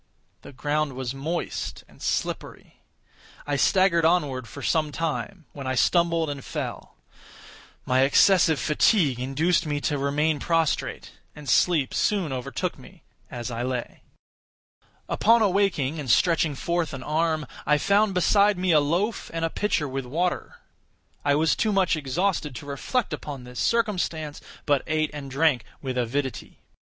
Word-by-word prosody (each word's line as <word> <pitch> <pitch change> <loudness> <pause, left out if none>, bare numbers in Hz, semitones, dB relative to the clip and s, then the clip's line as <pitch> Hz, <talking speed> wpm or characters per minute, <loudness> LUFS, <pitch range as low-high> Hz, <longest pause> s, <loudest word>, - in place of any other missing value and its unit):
The - - -11
ground 145 +1 -1
was 130 -1 -4
moist 155 +6 -4
and - - -20
slippery. - - -4 0.6
I 145 - -1
staggered 170 +4 +3
onward 145 -7 +1
for - - -9
some 155 -2 +1
time, 165 +3 -4
when 140 -2 -7
I 130 - -1
stumbled 170 +3 +2
and 140 -2 -5
fell. - - -6 0.9
My 130 0 +2
excessive 160 +3 +4
fatigue 150 - +2
induced 150 +7 +1
me 145 -1 -1
to 145 -1 -1
remain 145 +2 +1
prostrate; 165 -1 -1 0.2
and 150 -1 -11
sleep 150 +2 +3
soon 190 -9 0
overtook 125 -1 -3
me - - -16 0.3
as 120 0 -5
I 115 0 -3
lay. 125 -1 -4 1.1
Upon 230 +1 +4
awaking, 180 -7 +1
and 140 -4 -5
stretching 160 +2 +3
forth 170 0 -2
an 130 - -8
arm, 155 +1 0 0.2
I 150 0 +4
found 200 +3 +2
beside 200 +3 +4
me 180 0 +1
a 155 - +6
loaf 175 +10 -1
and 165 0 -1
a 165 - -2
pitcher 195 -8 0
with 135 -1 -4
water. 175 +7 -2 0.7
I 145 0 +3
was 160 +2 +2
too 215 - +1
much 190 -3 +2
exhausted 155 +1 -1
to 120 - -8
reflect 175 - -2
upon 140 -4 -6
this 125 0 -8
circumstance, 175 -10 -1 0.2
but 145 -2 +2
ate 155 -1 0
and 145 -2 -7
drank 140 -2 +2 0.2
with 130 -2 -4
avidity. 125 +2 -3
155 Hz, 150 wpm, -25 LUFS, 135-175 Hz, 1.1 s, a